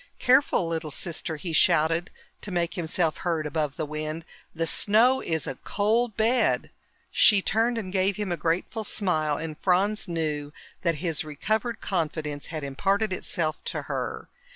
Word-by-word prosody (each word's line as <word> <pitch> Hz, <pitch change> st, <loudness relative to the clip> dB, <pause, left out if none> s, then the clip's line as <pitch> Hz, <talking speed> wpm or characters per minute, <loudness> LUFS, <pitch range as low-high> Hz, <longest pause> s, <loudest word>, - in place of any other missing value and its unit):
"Careful, 255 Hz, -8 st, +3 dB
little 160 Hz, -1 st, -3 dB
sister!" 160 Hz, +1 st, -3 dB
he 165 Hz, +2 st, -5 dB
shouted, 165 Hz, +1 st, +3 dB, 0.3 s
to -, -, -5 dB
make 175 Hz, -2 st, -1 dB
himself 165 Hz, -1 st, 0 dB
heard 165 Hz, -4 st, -1 dB
above 150 Hz, -2 st, -1 dB
the 155 Hz, -, -2 dB
wind. 155 Hz, +2 st, -4 dB, 0.3 s
"The 165 Hz, 0 st, 0 dB
snow 225 Hz, +10 st, +3 dB
is 160 Hz, -2 st, -1 dB
a 130 Hz, -, -5 dB
cold 220 Hz, +2 st, +1 dB
bed!" 230 Hz, +3 st, +2 dB, 0.4 s
She 205 Hz, -2 st, +6 dB
turned 230 Hz, +2 st, +2 dB
and 190 Hz, -4 st, -4 dB
gave 190 Hz, 0 st, +2 dB
him 210 Hz, -3 st, -3 dB
a -, -, +1 dB
grateful 170 Hz, +7 st, -1 dB
smile, 155 Hz, -8 st, 0 dB
and 160 Hz, -1 st, -5 dB
Franz 195 Hz, +6 st, +1 dB
knew 150 Hz, -4 st, -2 dB, 0.3 s
that 170 Hz, -2 st, +1 dB
his 160 Hz, -3 st, 0 dB
recovered 215 Hz, -, -2 dB
confidence 155 Hz, -5 st, -2 dB
had 155 Hz, -2 st, -5 dB
imparted 195 Hz, +9 st, 0 dB
itself 155 Hz, -4 st, -2 dB
to -, -, -3 dB
her. -, -, -4 dB
170 Hz, 155 wpm, -26 LUFS, 155-205 Hz, 0.4 s, She